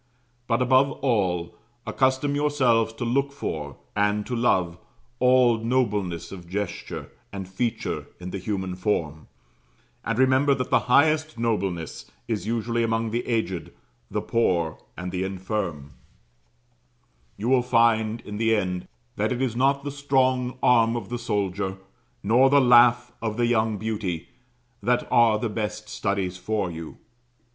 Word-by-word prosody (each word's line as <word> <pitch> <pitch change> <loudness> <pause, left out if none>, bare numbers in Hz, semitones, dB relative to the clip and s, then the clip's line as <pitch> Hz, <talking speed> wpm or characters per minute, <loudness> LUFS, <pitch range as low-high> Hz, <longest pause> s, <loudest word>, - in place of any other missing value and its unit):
But 115 +1 +2
above 130 +3 +4
all, 90 -9 0 0.3
accustom 130 +5 +1
yourselves 130 -6 +2
to 120 +1 -4
look 140 +4 +1
for, 75 - -5 0.2
and 105 0 +1
to 125 - -3
love, 90 -8 +1 0.4
all 125 -2 +4
nobleness 105 -8 -1
of 90 -3 -10
gesture 100 0 -5 0.2
and 95 -2 -6
feature 110 +5 -3
in 90 0 -7
the 100 - -4
human 95 -1 -3
form; 80 -6 -2 0.8
and 115 - -2
remember 130 +2 +4
that 130 -1 -4
the - - +5
highest 155 +3 +3
nobleness 95 -8 -2 0.2
is 110 -3 -2
usually 115 +1 -1
among 115 -1 0
the 120 +2 -2
aged, 110 -7 -2 0.4
the - - -2
poor, 85 -9 0 0.2
and 90 0 -5
the 90 0 -2
infirm; 95 -6 -4 1.5
you 105 +4 -3
will 130 0 +4
find, 115 -2 +2
in 105 0 -7
the 115 0 +2
end, 90 -3 -2 0.3
that 105 +3 0
it 125 - -1
is 130 -3 -1
not 140 +2 +2
the 145 - -4
strong 130 -3 +1
arm 115 -1 +4
of 115 -5 -5
the 120 0 -3
soldier, 100 -3 -2 0.5
nor 120 +6 +5
the 140 +1 +5
laugh 120 -1 +5
of 110 -1 -3
the 120 - +2
young 110 -2 +1
beauty, 100 -6 -3 0.5
that 120 +4 +1
are 115 -2 +5
the 115 - -2
best 105 0 -4
studies 100 -3 -2
for 105 -1 -2
you. 80 -1 -8
115 Hz, 145 wpm, -25 LUFS, 95-125 Hz, 1.5 s, the